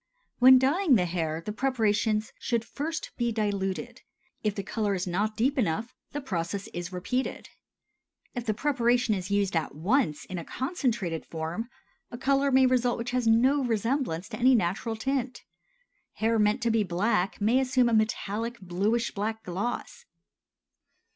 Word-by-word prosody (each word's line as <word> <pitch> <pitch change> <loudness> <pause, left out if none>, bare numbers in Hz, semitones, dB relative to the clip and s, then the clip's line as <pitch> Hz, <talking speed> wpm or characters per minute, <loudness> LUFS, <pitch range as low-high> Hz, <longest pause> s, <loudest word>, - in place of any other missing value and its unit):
When 260 +1 +9
dyeing 285 +4 +3
the 180 -5 +3
hair 165 -2 -2
the 210 - -2
preparations 220 -3 0
should 235 -2 -1
first 310 +6 -4
be 235 -1 0
diluted; 200 -3 -2 0.4
if 210 -2 0
the 200 - -3
color 205 0 -1
is 185 +1 -2
not 205 +4 -1
deep 270 +5 +1
enough, 220 +2 -1 0.2
the 290 - -4
process 195 -4 -3
is 175 0 -6
repeated. 250 +9 -3 0.8
If 245 -2 -5
the 215 - +1
preparation 245 -3 +2
is 185 -1 -3
used 200 -2 +1
at 160 -3 -1
once 170 - +1
in 185 -2 -5
a - - -6
concentrated 235 - -2
form, 165 +8 -4 0.4
a 240 - -7
color 275 +2 +2
may 265 0 +5
result 250 -1 +2
which 230 +1 -4
has 250 -2 0
no 260 +5 +4
resemblance 230 - -1
to - - -6
any 255 +1 +5
natural 220 +3 0
tint; 255 +2 -2 0.7
hair 225 +1 +1
meant 210 +4 +2
to 235 - +2
be 225 -1 +3
black 190 0 0
may 225 +5 +3
assume 255 -2 +2
a 235 - +1
metallic 220 +1 0
bluish 200 +6 -1
black 220 +2 -3
gloss. 235 - -4
225 Hz, 160 wpm, -28 LUFS, 195-250 Hz, 0.8 s, When